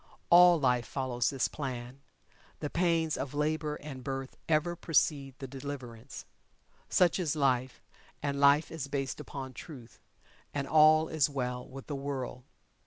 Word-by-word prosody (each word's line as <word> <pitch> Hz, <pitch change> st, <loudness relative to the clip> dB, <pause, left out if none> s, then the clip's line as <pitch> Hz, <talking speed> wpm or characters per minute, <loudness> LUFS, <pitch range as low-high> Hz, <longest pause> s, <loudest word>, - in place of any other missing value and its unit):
All 175 Hz, -1 st, +8 dB
Life 125 Hz, -4 st, +1 dB
follows 130 Hz, -3 st, -1 dB
this 135 Hz, -2 st, 0 dB
plan 130 Hz, -2 st, -6 dB, 0.6 s
the 150 Hz, -, -4 dB
pains 165 Hz, -2 st, +1 dB
of 140 Hz, +1 st, -5 dB
labor 150 Hz, 0 st, 0 dB
and 140 Hz, -4 st, -8 dB
birth 135 Hz, 0 st, -5 dB
ever 165 Hz, +2 st, +2 dB
precede 145 Hz, -5 st, +1 dB
the 135 Hz, -, -7 dB
Deliverance. 130 Hz, -3 st, -8 dB, 0.6 s
Such 180 Hz, +1 st, +3 dB
is 165 Hz, -4 st, 0 dB
Life 130 Hz, -3 st, 0 dB, 0.4 s
and 140 Hz, -1 st, -1 dB
Life 140 Hz, +2 st, +5 dB
is 160 Hz, -4 st, -5 dB
based 135 Hz, -2 st, -3 dB
upon 135 Hz, -2 st, -7 dB
Truth 125 Hz, -4 st, -11 dB, 0.6 s
and 140 Hz, -1 st, -2 dB
all 155 Hz, 0 st, +6 dB
is 155 Hz, -3 st, +2 dB
well 125 Hz, -3 st, -3 dB
with 135 Hz, 0 st, -9 dB
the 145 Hz, -, -4 dB
world. 135 Hz, -3 st, -5 dB
140 Hz, 145 wpm, -31 LUFS, 130-155 Hz, 0.6 s, All